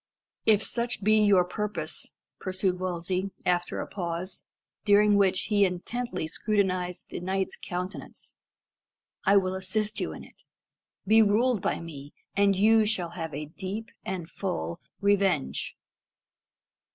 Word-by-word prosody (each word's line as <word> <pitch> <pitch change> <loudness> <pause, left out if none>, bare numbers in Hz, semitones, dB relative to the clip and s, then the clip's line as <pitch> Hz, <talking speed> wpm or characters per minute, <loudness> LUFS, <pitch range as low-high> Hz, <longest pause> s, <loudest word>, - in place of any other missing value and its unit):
"If 215 -1 +5
such 235 -3 -1
be 215 +1 +5
your 195 -4 +5
purpose," 210 +3 -3 0.3
pursued 185 -1 -1
Wolsey, 185 +1 -2 0.2
after 175 -1 +1
a - - -2
pause, 180 -1 -5 0.4
during 210 0 +5
which 195 -2 +3
he 205 -1 +2
intently 185 0 -2
scrutinised 185 -1 -1
the - - -5
knight's 190 +1 -1
countenance, 180 +2 -6 0.9
"I 200 +1 +6
will 185 -1 +2
assist 205 +3 -2
you - - -2
in - - -8
it. - - -18 0.6
Be 220 +3 +6
ruled 220 +1 +3
by - - 0
me, 145 -4 -9 0.2
and 200 0 +4
you 220 +3 +5
shall 195 -5 0
have 165 -3 -5
a 150 - -4
deep 195 +8 -6
and 185 -3 -4
full 85 - -3 0.2
revenge." 195 -7 +1
190 Hz, 130 wpm, -28 LUFS, 180-210 Hz, 0.9 s, I